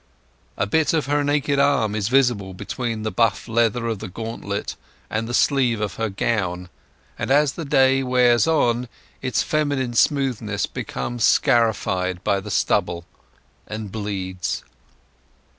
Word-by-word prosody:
A - - +1
bit 155 +11 +1
of 155 -4 +1
her 145 +1 +1
naked 145 -1 +1
arm 140 -7 +2
is 105 -2 -1
visible 120 -7 +2
between 115 +2 -4
the 110 - -2
buff 115 -3 +1
leather 115 0 +1
of 115 -3 -2
the - - -6
gauntlet 105 0 -5 0.4
and 110 +1 -1
the - - -4
sleeve 130 -6 +2
of 105 -2 -3
her 115 -1 -1
gown; 90 -4 -2 0.5
and - - -3
as 145 +1 +4
the 165 - -6
day 135 -1 +4
wears 125 0 +3
on 125 -6 +2 0.3
its 130 -2 0
feminine 145 -5 -1
smoothness 115 -5 +1
becomes 120 -2 -4
scarified 95 -9 +2
by 100 -2 +1
the 100 +2 -8
stubble 85 -3 0 0.6
and 110 -2 -6
bleeds. 95 -4 -3
115 Hz, 140 wpm, -22 LUFS, 100-135 Hz, 0.6 s, as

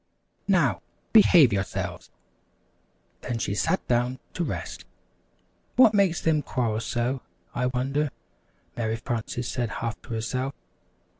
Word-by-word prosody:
"Now, - - +3 0.3
behave 175 - +7
yourselves!" 95 -1 -3 1.1
Then 120 -2 -3
she 110 - -1
sat 105 - 0
down 125 +1 +1 0.2
to 175 - -1
rest. - - -5 0.9
"What 245 -4 +7
makes 195 -4 +3
them 155 -2 +2
quarrel 115 -6 -1
so, 120 +3 -1 0.3
I 125 0 0
wonder," 135 +4 0 0.7
Mary 110 -1 -1
Frances 115 +1 -3
said 120 -2 -2
half 115 +2 -4
to 115 - -6
herself. 130 +4 -2
125 Hz, 120 wpm, -26 LUFS, 115-145 Hz, 1.1 s, behave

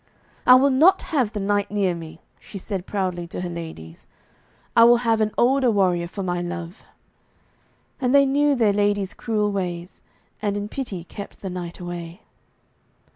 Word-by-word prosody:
'I 250 - +10
will 270 +2 +5
not 315 +9 +5
have 255 -8 +2
the 210 - -4
knight 205 0 0
near 200 -3 0
me,' 165 0 -9 0.2
she 200 - -10
said 190 -1 -5
proudly 185 -4 -2
to 170 - -6
her 180 - -4
ladies. 160 - -9 0.7
'I 230 - +7
will 240 0 +7
have 225 -1 +2
an 215 - +2
older 260 +1 +3
warrior 180 -5 +1
for 195 +3 -6
my 175 -1 -2
love.' 175 +1 -6 1.2
And 255 -3 0
they 280 0 +6
knew 285 +1 +2
their 220 -5 +3
lady's 205 -1 0
cruel 210 -2 -1
ways, 180 -2 -4 0.4
and 205 -1 -1
in 205 0 -4
pity 215 -11 -5
kept 200 +3 -10
the 190 - -5
knight 175 -2 -6
away. 175 +1 -7
200 Hz, 170 wpm, -23 LUFS, 175-225 Hz, 1.2 s, I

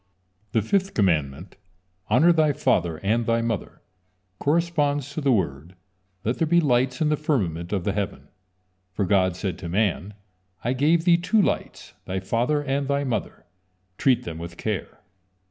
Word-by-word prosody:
The 110 - +2
fifth 195 - 0
commandment: 80 -3 0 0.5
"Honor 155 +11 +5
thy 155 -3 +3
father 85 - +1
and 115 +4 +1
thy 115 0 +2
mother," 115 -4 -4 0.6
corresponds 145 -3 0
to 155 - -3
the 140 -2 +2
word: 85 - -1 0.5
"Let 115 +4 -1
there 165 - +2
be 170 +2 +4
lights 125 -3 +1
in 155 - +3
the 150 - +3
firmament 95 - -1
of 100 -4 -1
the 100 - 0
heaven," 100 -1 -4 0.6
for 100 - 0
God 95 -2 +2
said 90 -1 -4
to 85 -3 -6
man: 100 +1 0 0.5
"I 120 - 0
gave 160 +6 +2
thee 170 -2 +6
two 180 +6 +1
lights, 200 - -2
thy 95 +1 -2
father 120 +10 0
and 140 0 -1
thy 140 0 0
mother, 125 -5 -4 0.5
treat 130 -3 +3
them 80 -1 -6
with 85 0 -8
care." 105 -5 -4
115 Hz, 160 wpm, -24 LUFS, 95-145 Hz, 0.6 s, thee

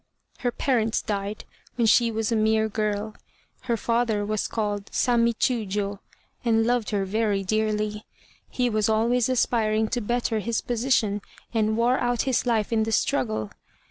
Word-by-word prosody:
"Her 245 - 0
parents 230 -4 +1
died 205 0 -3 0.3
when 235 - +1
she 230 +1 +5
was 225 0 -2
a - - +2
mere 220 0 +2
girl. 215 0 -2 0.5
Her 235 -2 0
father 230 -2 0
was 215 0 -1
called 205 -2 -3
Sammi 235 -1 +2
Chiûjiô, 205 -4 -1 0.4
and 225 -2 +2
loved 240 -2 +1
her 200 -2 0
very 205 0 0
dearly. 215 +1 -1 0.4
He 250 -1 0
was 215 -2 +1
always 230 +3 +2
aspiring 220 -3 +1
to 245 - -1
better 235 0 -1
his 230 +2 -1
position, 230 -4 0 0.3
and 220 -1 +1
wore 245 +2 +2
out 245 -1 0
his 260 -2 0
life 225 -2 +1
in 220 - +2
the 220 +1 -1
struggle. 110 - 0
220 Hz, 155 wpm, -25 LUFS, 210-235 Hz, 0.5 s, she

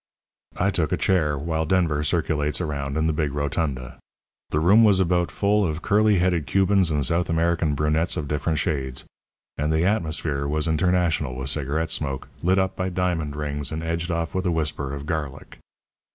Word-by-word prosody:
"I 100 +2 +1
took 80 -6 0
a - - +1
chair, 75 -6 +1
while 80 +2 -2
Denver 85 -5 +1
circulates 75 -1 0
around 70 -4 -3
in 80 - +1
the 80 - +1
big 75 -2 -1
rotunda. 70 -4 -3 0.5
The 75 - 0
room 100 +8 +5
was 100 -3 +5
about 90 -1 +1
full 105 +1 +1
of 80 -2 -2
curly 105 0 +3
headed 90 -4 +1
Cubans 95 -2 +3
and 75 -3 +1
South 85 +6 +1
American 85 -2 +1
brunettes 75 +3 0
of 75 - -3
different 75 +2 -1
shades; 65 -5 -2 0.5
and 75 +1 0
the 80 +2 +2
atmosphere 80 -7 -1
was 75 +1 -1
international 80 -4 +1
with 65 +1 -1
cigarette 75 +2 -2
smoke, 70 -3 -2
lit 95 +2 +2
up 95 0 0
by 95 0 -2
diamond 85 -5 -1
rings 75 -2 -2
and 80 +1 -4
edged 85 +1 -2
off 85 -1 -2
with 95 0 -1
a - - +1
whisper 75 -4 -1
of 70 0 -6
garlic. 75 -4 -5
80 Hz, 180 wpm, -24 LUFS, 75-90 Hz, 0.5 s, room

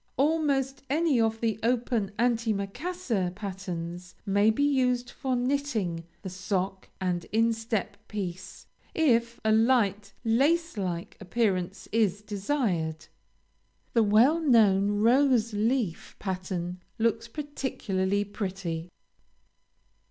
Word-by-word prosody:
Almost 275 -2 +1
any 295 -4 +2
of 225 0 0
the 225 -2 0
open 230 -3 0
anti 230 -1 +2
maccassar 200 - -2
patterns 180 -3 -6
may 205 +1 +4
be 220 +6 +1
used 250 -3 +1
for 260 -2 -2
knitting 245 - -1 0.2
the 190 - -4
sock 190 0 -3
and 180 -2 -1
instep 225 -2 0
piece, 190 -2 -6 0.3
if 235 -7 +2
a 220 - +4
light 220 -3 +2
lace 300 +9 +2
like 185 0 -4
appearance 195 -2 -1
is 210 -2 +1
desired. 200 - -1 0.9
The 230 - +4
well 225 +10 +5
known 210 -9 +4
rose 240 -2 +4
leaf 215 -3 -1
pattern 185 -2 -4 0.2
looks 230 0 +1
particularly 210 -8 -2
pretty. 185 -5 -4
220 Hz, 105 wpm, -28 LUFS, 190-250 Hz, 0.9 s, well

